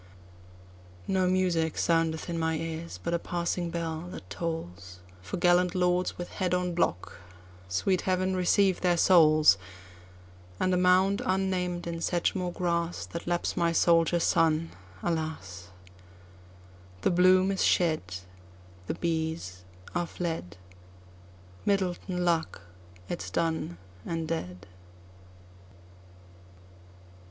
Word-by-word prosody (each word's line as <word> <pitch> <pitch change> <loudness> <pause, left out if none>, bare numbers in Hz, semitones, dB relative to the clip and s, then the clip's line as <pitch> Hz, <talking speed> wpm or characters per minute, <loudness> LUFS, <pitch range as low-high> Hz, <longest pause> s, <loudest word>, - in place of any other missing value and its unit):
No 190 -1 +2
music 180 -3 +1
soundeth 165 -1 +1
in 170 -1 -3
my 160 0 0
ears, 165 +1 -5
but 170 - -1
a 170 - +1
passing 175 0 -2
bell 165 0 -4
that 95 - -9
tollsFor 90 - -6
gallant 175 +1 +3
lords 180 0 +1
with 175 - -6
head 180 -2 0
on 180 -1 -1
block—sweet 90 - -2
Heaven 185 0 0
receive 185 +1 +2
their 175 -1 +2
souls! 155 - +6 1.0
And 185 - +1
a - - +3
mound, 185 +2 +3
unnamed, 185 -2 -1
in 170 -1 -4
Sedgemoor 175 +1 0
grass, 170 -1 -1
That 170 - -7
laps 175 0 -1
my 170 -2 +2
soldier 170 0 +3
son, 165 -1 +2 0.3
alas! 155 - -3 1.3
The - - +2
bloom 185 +2 +5
is 195 - 0
shed—The 90 - -2
bees 160 - -3 0.3
are 175 -1 -1
fled—Myddelton 95 - -5
luck 165 -2 0 0.5
it 175 - -4
's - - -6
done 160 - -1 0.3
and 165 -1 -3
dead. 90 - -4
170 Hz, 105 wpm, -28 LUFS, -, 1.3 s, souls